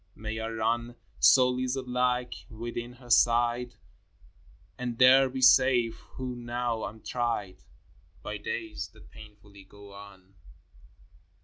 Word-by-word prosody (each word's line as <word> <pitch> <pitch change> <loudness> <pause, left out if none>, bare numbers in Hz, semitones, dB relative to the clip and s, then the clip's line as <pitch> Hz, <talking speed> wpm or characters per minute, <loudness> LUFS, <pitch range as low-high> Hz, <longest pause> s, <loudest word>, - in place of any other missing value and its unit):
May 110 +1 -6
I 110 - -3
run 115 +2 -2 0.2
So, 130 -2 +6
lizard 130 +1 -2
like, 125 0 0 0.2
within 120 +2 -6
her 125 -1 -12
side, 120 +1 +2 1.0
And 120 +2 -5
there 130 +1 +6
be 130 0 -4
safe, 125 -3 +4 0.2
who 130 -1 -4
now 120 -1 -3
am 110 0 -12
tried 115 -6 -3 0.7
By 105 - -5
days 105 -1 -5
that - - -18
painfully 105 -2 -15
go 100 +1 -15
on 100 -1 -14
120 Hz, 120 wpm, -28 LUFS, 110-125 Hz, 1.0 s, So